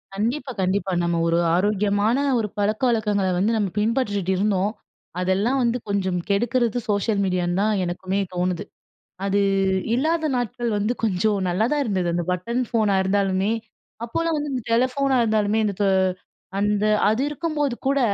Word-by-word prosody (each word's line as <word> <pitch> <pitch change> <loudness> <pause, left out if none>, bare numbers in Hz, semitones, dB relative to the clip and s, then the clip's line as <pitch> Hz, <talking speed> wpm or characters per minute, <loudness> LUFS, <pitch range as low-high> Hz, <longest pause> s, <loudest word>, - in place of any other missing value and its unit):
கண்டிப்பா, 250 +6 -2
கண்டிப்பா. 190 +1 0
நம்ம 170 0 0
ஒரு 165 0 +2 0.2
ஆரோக்கியமான 205 +4 +1 0.2
ஒரு 215 - -1
பழக்கவழக்கங்கள்ல 210 -3 +1
வந்து 220 +4 +2
நம்ம 205 -3 0
பின்பற்றிட்டு 210 -5 0
இருந்தோம். 200 0 +1 0.5
அதெல்லாம் 195 +9 +1
வந்து 235 +1 +1
கொஞ்சம் 190 -3 0
கெடுக்கிறது, 240 +3 +1
சோஷியல் 205 0 +1
மீடியான்னு 180 0 0
தான் 215 +1 +2
எனக்குமே 185 +3 -2
தோணுது. 180 -1 -1 0.6
அது 200 +1 +1 0.5
இல்லாத 315 +5 +1
நாட்கள் 240 0 -2
வந்து 210 +4 0
கொஞ்சம் 205 0 +1
நல்லா 180 +5 +1
தான் 295 -1 +1
இருந்தது. 185 -5 -1
அந்த 175 0 0
பட்டன் 235 +8 -1
ஃபோனா 215 -5 +2
இருந்தாலுமே, 195 +1 +1 0.5
அப்போலாம் 330 +7 -1
வந்து 295 -1 -3
இந்த 250 -3 -3
டெலிஃபோனா 260 +3 +2
இருந்தாலுமே, 215 -1 +1
இந்த 200 - -1 0.8
அந்த 205 0 +1 0.2
அது 220 +4 +1
இருக்கும்போது 295 -3 -1
கூட 275 +1 +2
210 Hz, 140 wpm, -23 LUFS, 190-240 Hz, 0.8 s, ஒரு